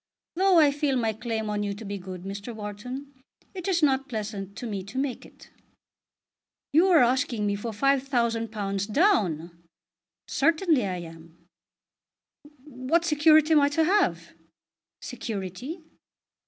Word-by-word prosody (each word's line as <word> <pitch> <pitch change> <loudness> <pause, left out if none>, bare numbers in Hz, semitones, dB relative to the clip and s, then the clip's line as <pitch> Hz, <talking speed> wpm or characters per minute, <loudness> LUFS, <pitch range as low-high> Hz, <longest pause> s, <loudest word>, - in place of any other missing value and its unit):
Though 375 +1 +3
I 300 -3 +6
feel 285 -1 0
my 225 -2 0
claim 220 0 -3
on 210 0 -2
you 200 -1 -2
to 220 +2 -9
be 200 0 -5
good, 185 -1 -8
Mr. 200 +4 -6
Wharton, 250 +7 -7 0.4
it 370 -2 -6
is 350 -4 +1
not 270 -1 +2
pleasant 205 -3 -5
to 245 - -7
me 200 -4 -4
to 200 +7 -9
make 265 -2 -3
it." - - -19 1.2
"You 335 +5 +5
are 340 -7 +6
asking 245 -3 +1
me 205 - +1
for 205 +3 -5
£5000 230 -6 0
down!" 175 - +1 0.7
"Certainly 320 - +2
I 185 -1 -3
am." 165 0 -13 1.2
"What 295 +4 -1
security 310 0 +5
am 305 - +6
I 285 - +3
to 320 +2 +1
have?" 245 - +1 0.7
"Security?" 240 - -6
235 Hz, 140 wpm, -26 LUFS, 200-295 Hz, 1.2 s, I